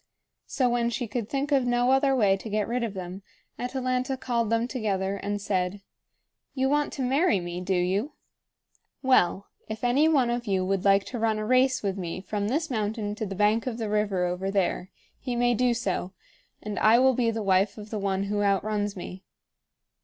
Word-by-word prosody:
So, 260 -3 +1
when 240 -1 +1
she 240 +2 -2
could 225 0 -4
think 280 +1 -2
of 275 -2 +4
no 245 +1 +2
other 270 0 +3
way 205 -6 +4
to 195 +3 -8
get 210 0 0
rid 245 +1 -1
of 215 -4 -3
them, 185 +1 -6 0.4
Atalanta 255 +1 -1
called 235 -3 -1
them 230 +1 +1
together 200 -6 -2
and 205 +1 -3
said: 195 -1 -2 0.7
"You 265 0 +1
want 295 +1 +1
to 270 - -3
marry 275 - +2
me, 175 0 -5
do 190 +1 0
you? 190 +10 0 0.9
Well, 200 -7 +3 0.2
if 220 +2 -6
any 260 +6 +3
one 265 -6 +3
of 240 -1 -3
you 190 -2 +1
would 195 0 0
like 195 0 +5
to 245 - -5
run 220 -1 +1
a 215 - -3
race 255 +1 +3
with 195 -1 -2
me 175 0 -4
from 205 +1 -3
this 305 +6 -1
mountain 215 -2 -2
to 215 0 -4
the 195 - -5
bank 210 +4 +2
of 235 -3 -3
the 220 -3 -3
river 205 -4 +1
over 180 +2 -2
there, 190 -2 0 0.3
he 250 -2 -4
may 240 0 +2
do 245 +2 +2
so; 200 -5 -2 0.5
and 210 -2 -4
I 220 +2 +6
will 260 +1 +5
be 240 -1 +1
the 225 -1 -2
wife 195 +1 +2
of 210 0 -10
the 215 - -2
one 195 -1 -1
who 205 +1 -1
outruns 205 +1 0
me." 185 +1 -8
215 Hz, 205 wpm, -26 LUFS, 195-250 Hz, 0.9 s, I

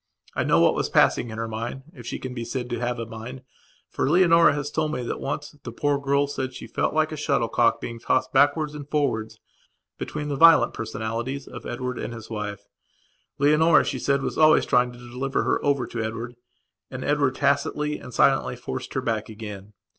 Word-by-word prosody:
I - - 0
know - - +3
what - - +5
was - - -1
passing 120 - +3
in 110 - -7
her 115 0 -2
mind, 115 +4 -5
if 120 -3 -11
she - - -3
can 130 -1 -6
be 120 -2 -4
said 125 +1 -4
to 120 - -2
have 120 0 -2
a 115 - -4
mind, 115 +4 -8 0.4
for - - -1
Leonora 170 -2 +5
has 145 0 -3
told 155 -1 0
me 125 - -3
that, - - -4
once, 145 +1 -4
the 115 - -6
poor 145 +4 0
girl 140 0 +2
said 130 -2 -4
she - - -8
felt - - -1
like 155 0 +2
a - - -3
shuttlecock 120 -5 +1
being 115 -1 -6
tossed 130 - 0
backwards 145 +2 +3
and 145 -1 -8
forwards 125 -8 -1 0.6
between 150 -1 -4
the 145 - -2
violent 165 +2 +6
personalities 115 +5 -4
of - - -9
Edward 125 +1 -4
and 120 - -5
his 110 0 -10
wife. 105 -2 -4 0.8
Leonora, 150 +3 +5
she 130 - -3
said, 140 +2 +1
was - - -3
always 155 0 +6
trying 125 0 +2
to 120 - -13
deliver 125 +3 -3
her - - 0
over 140 -3 +1
to 115 0 -5
Edward, 115 +2 -5 0.5
and 130 0 -6
Edward 145 -3 +1
tacitly 145 +2 0
and 125 - -10
silently - - +2
forced 65 - -6
her - - +1
back 110 -2 -2
again. 105 -2 -8
130 Hz, 205 wpm, -25 LUFS, 115-145 Hz, 0.8 s, violent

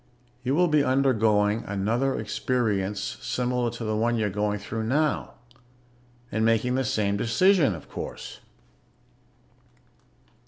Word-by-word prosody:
You 130 +2 0
will 180 +2 +4
be 150 -3 +3
undergoing 110 -5 +2
another 115 +7 0
experience 105 -5 -1
similar 125 -1 -1
to 120 0 -7
the 110 -1 -1
one 115 +2 +1
you're 105 -3 0
going 105 +1 -1
through 110 +2 -4
now. 150 +5 0 1.0
And 110 +1 0
making 115 +2 +2
the 130 +1 +1
same 105 -6 0
decision, 140 - +3
of 80 - -11
course. - - -7
115 Hz, 120 wpm, -26 LUFS, 105-130 Hz, 1.0 s, will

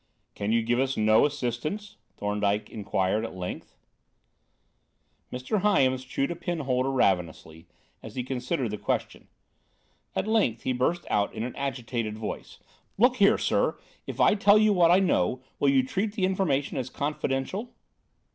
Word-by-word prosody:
"Can 100 +1 -2
you 115 0 +2
give 120 +2 +1
us 135 0 0
no 110 +5 +5
assistance?" 145 - -4 0.2
Thorndyke 105 0 -1
inquired, 100 0 -1
at 115 - -6
length. 90 -1 -6 1.6
Mr. 130 - -2
Hyams 130 -11 +2
chewed 135 +3 -2
a - - -3
pen 170 -1 -3
holder 130 -1 0
ravenously, 90 -8 -1 0.3
as - - -10
he 125 - -2
considered 130 -1 -2
the 105 - -5
question. - - -3 0.9
At - - 0
length, 210 - +1
he 130 - 0
burst 160 +8 0
out 100 -1 +1
in 110 - -3
an 125 - -5
agitated 120 -5 -3
voice: 110 - -6 0.4
"Look 245 +4 +4
here, 200 -1 +5
sir, - - +1 0.3
if - - -6
I - - +5
tell 205 0 +5
you 215 -1 +4
what 175 -3 +4
I 175 - +6
know, 130 - +1 0.2
will 140 - +3
you 135 -1 +4
treat 200 +9 -2
the 200 -4 0
information 180 -8 0
as 130 -1 -4
confidential? 150 - -3
130 Hz, 155 wpm, -27 LUFS, 110-175 Hz, 1.6 s, I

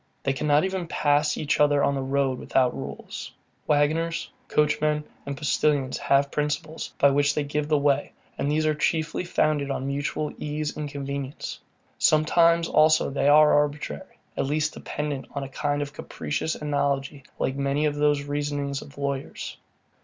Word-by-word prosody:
They 135 - +1
cannot 150 +2 +2
even 190 -2 -2
pass 145 -1 +2
each 150 -1 0
other 145 -1 +4
on 140 - +2
the 135 - -2
road 135 -1 0
without 130 -2 +1
rules. - - -7 0.4
Waggoners, 155 +3 +1 0.2
coachmen, 150 0 +1 0.2
and 140 -1 -4
postilions 145 -2 +1
have 140 0 +2
principles, 150 +2 -2
by 140 - +5
which 145 +1 +2
they 150 - +1
give 145 +1 -2
the 150 -1 +3
way; 140 0 +1 0.2
and 145 - -1
these 155 +1 +1
are 155 - +3
chiefly 155 +2 0
founded 155 -5 +1
on 135 -1 -2
mutual 145 +2 -2
ease 150 0 -3
and 150 -1 -4
convenience. 140 0 -5 0.4
Sometimes 165 +2 +4
also 155 -2 +4
they 140 0 +1
are 150 +1 +7
arbitrary, 145 - -1 0.2
at - - -1
least 155 +2 0
dependent 145 -2 -4
on 140 - -2
a 135 - -6
kind 145 +1 -1
of 145 0 -8
capricious 155 +1 -3
analogy 140 -1 -1 0.2
like 130 - -1
many 140 +2 0
of 150 - +1
the 150 0 +3 0.2
reasonings 145 -1 -2
of 140 - -13
lawyers. 140 -1 -4
145 Hz, 160 wpm, -25 LUFS, 140-150 Hz, 0.4 s, are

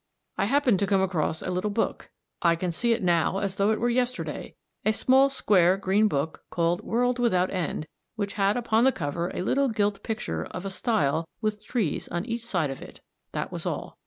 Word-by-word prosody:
I - - +1
happened 250 -3 +3
to 200 - +1
come 195 -1 +3
across 165 -4 -1
a 185 - -2
little 185 +3 -1
book 210 +2 -2 0.3
I 170 -1 +4
can 175 +1 -2
see 235 +8 0
it 230 -2 +1
now 175 +1 +2
as 195 -1 -2
though 200 +1 +3
it 220 - +1
were 240 - +1
yesterday 250 +1 -2 0.3
a 215 - +3
small 265 +4 +4
square 190 -8 +3
green 200 +2 +3
book 150 -3 -2
called 170 +2 0
World 245 +3 0
without 185 -7 +2
End, 170 -4 -2 0.3
which 205 -2 -3
had 200 +1 +2
upon 230 -1 +2
the 265 - +5
cover 170 - -3
a - - -4
little 275 +7 +2
gilt 205 -3 0
picture 80 - -3
of 185 +1 -7
a 195 - -3
stile 165 - 0
with 215 -1 -2
trees 220 - -1
on 175 +3 -3
each 235 -1 -3
side 175 -11 -1
of 135 - -7
it. - - -12 0.3
That - - -3
was - - -5
all. - - -5
200 Hz, 210 wpm, -26 LUFS, 175-230 Hz, 0.3 s, the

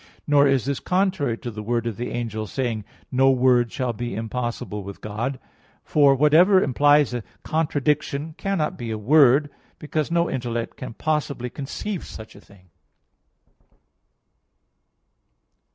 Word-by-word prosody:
Nor 145 -1 +4
is 135 -4 +2
this 140 -1 -2
contrary 180 - 0
to 120 - -6
the 105 -1 -7
word 115 +2 -1
of 115 -3 -3
the 120 +3 -4
angel, 110 -2 -4
saying: 115 -5 -3 0.3
"No 135 +1 +4
word 125 -2 +3
shall 125 -3 -2
be 120 0 -5
impossible 115 -1 -4
with 100 0 -9
God." 110 +6 -4 0.5
For 140 -2 +4
whatever 160 +8 +5
implies 145 -2 +3
a 120 - -2 0.2
contradiction 150 -1 -1
cannot 195 -6 -2
be 120 -2 -5
a 110 - -2
word, 140 +4 +4 0.3
because 155 0 -2
no 170 0 +2
intellect 120 -3 -3
can 125 -3 -8
possibly 140 -5 -2
conceive 160 +8 -5
such 110 0 -10
a - - -14
thing. 95 -2 -21
130 Hz, 135 wpm, -23 LUFS, 115-150 Hz, 0.5 s, whatever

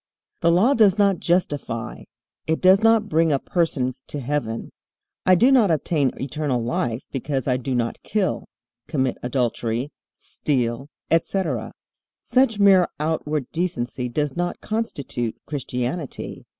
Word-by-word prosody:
The 170 - +3
Law 190 +11 +4
does 210 -5 +4
not 200 -4 +3
justify; 145 -9 -1 0.4
it 160 0 +1
does 190 +1 +6
not 225 -1 +4
bring 165 -4 +2
a 140 - +3
person 135 -5 0
to 145 - -5
heaven. 125 -4 -3 0.6
I 185 - +7
do 245 +9 +5
not 240 -7 +5
obtain 155 -3 +1
eternal 135 -3 -2
life 120 0 -2
because 135 -1 -2
I 125 -1 +2
do 130 0 -3
not 115 -1 -2
kill, 200 -5 -1 0.4
commit 130 -4 -1
adultery, 120 +1 -1 0.2
steal, 125 -2 -2 0.2
etc. 165 - 0 0.5
Such 245 -2 +2
mere 195 -3 +6
outward 150 -3 -2
decency 125 -8 -2
does 145 +2 -2
not 175 0 -2
constitute 140 - -3
Christianity. 135 +1 -4
150 Hz, 130 wpm, -23 LUFS, 125-185 Hz, 0.6 s, I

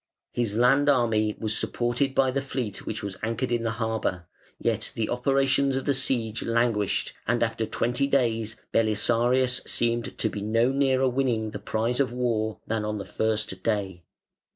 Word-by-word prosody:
His 115 -3 -1
land 135 +4 +4
army 115 -5 +2
was 110 0 -1
supported 125 +4 -1
by 130 -1 +3
the 140 +1 -1
fleet 125 -7 -4
which 105 0 -4
was 100 -2 -5
anchored 115 +3 -2
in 120 -1 +1
the 115 - -1
harbour, 110 -6 -2 0.3
yet - - -1
the 110 -2 -1
operations 135 +2 +2
of 135 - -2
the 140 - +2
siege 120 -4 0
languished, 115 -3 0
and 120 +1 +2
after 115 -1 -1
twenty 125 +5 0
days 115 -5 +1 0.2
Belisarius 120 +3 +2
seemed 120 0 0
to - - +1
be 105 -2 -4
no 115 +4 +2
nearer 135 -1 +2
winning 120 -4 0
the - - -6
prize 115 +3 -1
of 135 -3 +2
war 110 -4 -1
than 110 -1 -1
on 105 0 -2
the 100 - -5
first 105 -3 -2
day. 100 -5 -1
115 Hz, 170 wpm, -26 LUFS, 110-130 Hz, 0.3 s, land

